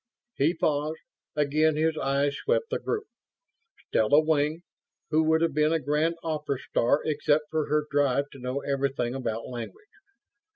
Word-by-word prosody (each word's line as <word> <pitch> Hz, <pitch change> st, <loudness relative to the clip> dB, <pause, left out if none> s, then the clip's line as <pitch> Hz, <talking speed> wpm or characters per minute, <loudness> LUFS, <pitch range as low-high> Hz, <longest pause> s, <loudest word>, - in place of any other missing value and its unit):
He 150 Hz, +5 st, +2 dB
paused, 155 Hz, 0 st, 0 dB, 0.4 s
again 150 Hz, +1 st, +2 dB
his 160 Hz, +1 st, +1 dB
eyes 140 Hz, 0 st, +1 dB
swept 485 Hz, 0 st, -1 dB
the -, -, 0 dB
group. 440 Hz, -1 st, -2 dB, 0.8 s
Stella 110 Hz, +7 st, +4 dB
Wing, 155 Hz, +1 st, +1 dB, 0.5 s
who 155 Hz, +1 st, +4 dB
would 160 Hz, +1 st, +3 dB
have 165 Hz, -, +1 dB
been 150 Hz, +1 st, +2 dB
a -, -, +3 dB
grand 150 Hz, +4 st, 0 dB
opera 150 Hz, -4 st, -2 dB
star 125 Hz, +3 st, +1 dB
except 150 Hz, 0 st, +2 dB
for 155 Hz, -2 st, 0 dB
her 150 Hz, 0 st, +1 dB
drive 140 Hz, 0 st, +1 dB
to 135 Hz, -, -12 dB
know 125 Hz, +2 st, -3 dB
everything 135 Hz, -3 st, -1 dB
about 115 Hz, -4 st, -3 dB
language. 125 Hz, -, -7 dB
150 Hz, 155 wpm, -27 LUFS, 140-155 Hz, 0.8 s, Stella